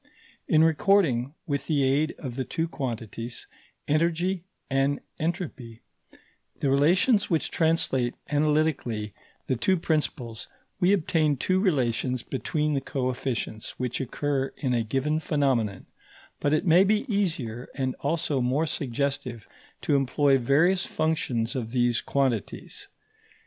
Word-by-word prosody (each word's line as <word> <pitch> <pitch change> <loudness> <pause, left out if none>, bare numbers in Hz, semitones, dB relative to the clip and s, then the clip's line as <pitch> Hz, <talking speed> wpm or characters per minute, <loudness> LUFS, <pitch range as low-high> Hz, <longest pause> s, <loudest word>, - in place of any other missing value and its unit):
In 155 0 +5
recording, 160 - +3
with 140 -4 -2
the 145 -3 +2
aid 140 +4 +2
of 130 -6 -6
the 130 - -1
two 165 +5 -2
quantities, 120 -5 -5 0.4
energy 170 +4 +1 0.2
and 135 +1 +1 0.2
entropy, 155 - -4 0.8
the 135 - +1
relations 185 - +3
which 165 -4 0
translate 145 -7 +1 0.2
analytically 145 -8 +1 0.3
the 130 - 0
two 185 +10 +2
principles, 145 -8 -2 0.3
we 180 +2 +4
obtain 155 -6 +2
two 185 +8 +1
relations 130 - +1
between 150 +4 -1
the 140 - 0
coefficients 130 -4 -3
which 125 +1 -2
occur 135 +1 -1
in 130 -4 -1
a 120 - +2
given 135 +7 0
phenomenon; 130 -11 0 0.5
but 145 - +1
it 155 +5 +2
may 175 +2 +6
be 210 +5 +2
easier 155 - -2
and 130 -1 -1
also 145 -2 0
more 130 +6 +1
suggestive 135 -4 -3 0.4
to 145 - +2
employ 135 0 +3
various 160 +10 +3
functions 135 -6 -1
of 120 -4 -3
these 120 -1 +1
quantities. 130 -8 -2
140 Hz, 125 wpm, -26 LUFS, 125-160 Hz, 0.8 s, may